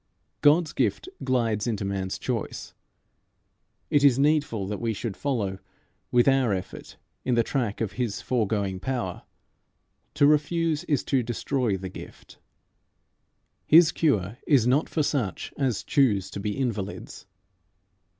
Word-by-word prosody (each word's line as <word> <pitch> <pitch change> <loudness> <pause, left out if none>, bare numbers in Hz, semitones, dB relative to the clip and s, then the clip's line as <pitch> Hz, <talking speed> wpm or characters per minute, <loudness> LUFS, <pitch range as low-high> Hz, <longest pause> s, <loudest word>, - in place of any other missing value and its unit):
God's 155 +2 +4
gift 125 - -1
glides 115 -4 0
into 105 -4 -2
man's 95 -1 -3
choice. - - -4 1.2
It 145 -1 +3
is 135 -4 +6
needful 145 -8 +1
that 105 +3 -5
we 115 -1 0
should 105 0 -4
follow 105 -7 -2 0.5
with 120 +1 +3
our 135 -5 +3
effort 90 - -8 0.3
in 125 - +1
the 115 - +3
track 115 -5 -2
of 110 - -1
his 120 -5 -3
foregoing 105 -6 -1
power. 120 -6 -3 0.9
To 145 - +4
refuse 150 +1 +2
is 145 -4 0
to 135 -2 +1
destroy 120 -2 -1
the 95 0 -6
gift. - - -12 1.3
His 165 +1 +7
cure 115 - 0
is 135 -7 +4
not 130 +5 +2
for 155 - 0
such 125 - -2
as 130 -7 -1
choose 105 -10 +2
to - - -6
be 105 +3 -3
invalids. 110 -7 -4
120 Hz, 135 wpm, -26 LUFS, 100-140 Hz, 1.3 s, His